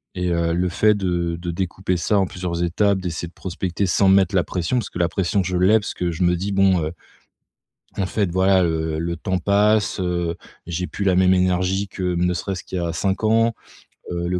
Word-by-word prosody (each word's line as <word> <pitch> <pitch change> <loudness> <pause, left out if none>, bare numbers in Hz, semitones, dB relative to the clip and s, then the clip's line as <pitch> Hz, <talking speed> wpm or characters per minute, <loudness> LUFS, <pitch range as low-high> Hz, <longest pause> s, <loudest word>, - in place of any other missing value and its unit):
Et, 90 -1 -1
heu, 85 -1 +1
le 90 +2 0
fait 105 +4 +3
de 85 -4 -1
de 85 0 -4
découper 90 +1 -2
ça 95 +4 +1
en 95 - +2
plusieurs 90 -2 -4
étapes, 95 +3 +1
d'essayer 85 -2 -4
de - - -25
prospecter 95 +1 -3
sans 95 +1 +3
me 95 - +6
mettre 95 0 +2
la 90 - +3
pression 90 +7 -2
parce 120 - -2
que 85 - -7
la 85 - +3
pression, 95 +2 0
je 90 0 -3
l'ai 95 +5 +4
parce 105 - -5
que 90 -1 -2
je 85 +3 -2
me 90 0 +3
dis: 95 +4 -3
«Bon, 95 -2 +3
heu, 75 - -3 1.1
en 100 - 0
fait, 95 -1 -1
voilà, 95 +1 +3
heu, 80 -2 -1
le 85 +1 -2
temps 95 +3 -1
passe, 105 +3 +2
heu, 85 -2 -1 0.3
j'ai 85 +1 -3
plus 100 - -5
la 95 -2 +3
même 95 0 +4
énergie 95 +2 +1
que 90 -2 -2
ne 90 +1 +1
serait-ce 95 +2 -4
qu'il 95 - -6
y - - -2
a 85 -1 -2
5 95 +5 -1
ans», 115 +1 +3 0.6
heu, 85 0 -2
le 90 0 0
90 Hz, 230 wpm, -21 LUFS, 85-95 Hz, 1.1 s, me